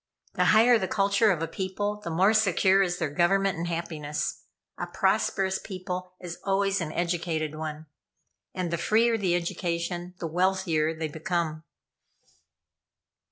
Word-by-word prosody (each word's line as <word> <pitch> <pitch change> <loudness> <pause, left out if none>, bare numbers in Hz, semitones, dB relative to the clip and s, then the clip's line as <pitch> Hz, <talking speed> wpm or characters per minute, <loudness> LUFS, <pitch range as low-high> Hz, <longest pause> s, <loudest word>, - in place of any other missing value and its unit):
The - - +1
higher 230 +2 +6
the 190 - -1
culture 200 +3 +3
of 170 -5 +1
a - - -1
people, 205 +4 -3
the - - -4
more 185 +6 +3
secure 195 -2 +4
is 175 -2 0
their 160 -4 -2
government 190 +3 +2
and 170 - -2
happiness. 160 -3 -3 0.3
A - - -3
prosperous 190 -1 +1
people 185 -1 -6
is 175 -2 -7
always 195 0 +1
an 155 -2 -3
educated 165 -3 -1
one; 155 0 -6 0.7
and 180 -2 -3
the 170 - -1
freer 225 +5 +3
the 190 -5 +1
education, 175 +1 -3
the 170 - -5
wealthier 175 -2 +1
they 160 0 -2
become." 160 0 -3
180 Hz, 145 wpm, -27 LUFS, 165-195 Hz, 0.7 s, higher